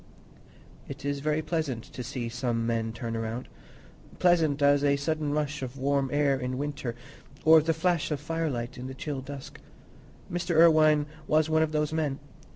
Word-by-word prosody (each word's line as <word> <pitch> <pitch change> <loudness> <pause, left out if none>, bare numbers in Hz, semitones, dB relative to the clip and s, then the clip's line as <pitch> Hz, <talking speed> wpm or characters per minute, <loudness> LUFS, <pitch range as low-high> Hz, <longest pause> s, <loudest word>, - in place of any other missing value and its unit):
It 140 +1 -8
is 140 0 -1
very 155 +2 0
pleasant 155 -9 -2
to 125 - -6
see 120 0 -4
some 120 -1 -1
men 115 -1 -1
turn 115 0 -5
round; 115 +2 -4 0.7
pleasant 165 -5 +3
as 145 0 +4
a 140 -1 +4
sudden 150 +1 -1
rush 150 -1 -1
of 130 +1 -6
warm 140 0 +1
air 145 -2 +2
in 125 0 -3
winter, 140 -4 -3 0.5
or 160 0 +8
the 160 +2 +1
flash 165 0 0
of 150 -3 -2
firelight 150 -7 -3
in 125 - -5
the 130 - -7
chill 140 -1 -4
dusk. 135 0 -9 0.7
Mr. 175 -1 -1
Irwine 155 -2 +6 0.2
was 155 0 +2
one 160 0 +4
of 160 -1 +1
those 150 0 0
men. 150 -4 -1
145 Hz, 170 wpm, -28 LUFS, 130-155 Hz, 0.7 s, or